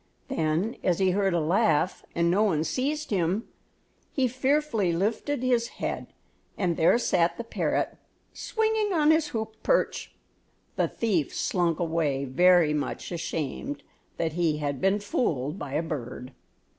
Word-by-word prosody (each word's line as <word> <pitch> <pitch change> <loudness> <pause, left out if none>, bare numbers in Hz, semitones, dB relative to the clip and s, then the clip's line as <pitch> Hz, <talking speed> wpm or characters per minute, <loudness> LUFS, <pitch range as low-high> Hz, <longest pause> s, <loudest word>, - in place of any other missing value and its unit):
Then 175 -1 0
as 180 -2 +2
he 190 -1 +3
heard 195 -1 +1
a - - +2
laugh, 175 +1 +2
and 170 0 +2
no 195 +4 +3
one 170 -8 +2
seized 285 - -2
him, 190 +3 0 0.6
he 265 -2 +1
fearfully 260 - +1
lifted 225 - -1
his 240 -2 +2
head, - - -3 0.5
and 180 -4 0
there 165 +8 +4
sat 170 -7 +1
the - - -4
parrot 230 - -1 0.4
swinging 440 -2 0
on 310 -2 +4
his 315 -1 +3
hoop 220 -3 -5
perch. - - 0 0.6
The - - +1
thief 190 - -1
slunk 175 -3 0
away 160 -5 0
very 170 +3 +4
much 150 +4 -3
ashamed 170 - -4 0.3
that 160 -2 -1
he 165 -3 +1
had 145 -3 -3
been 195 +2 +3
fooled 165 - -1
by 140 -2 -6
a 160 - 0
bird. 130 -4 -6
180 Hz, 145 wpm, -27 LUFS, 160-235 Hz, 0.6 s, there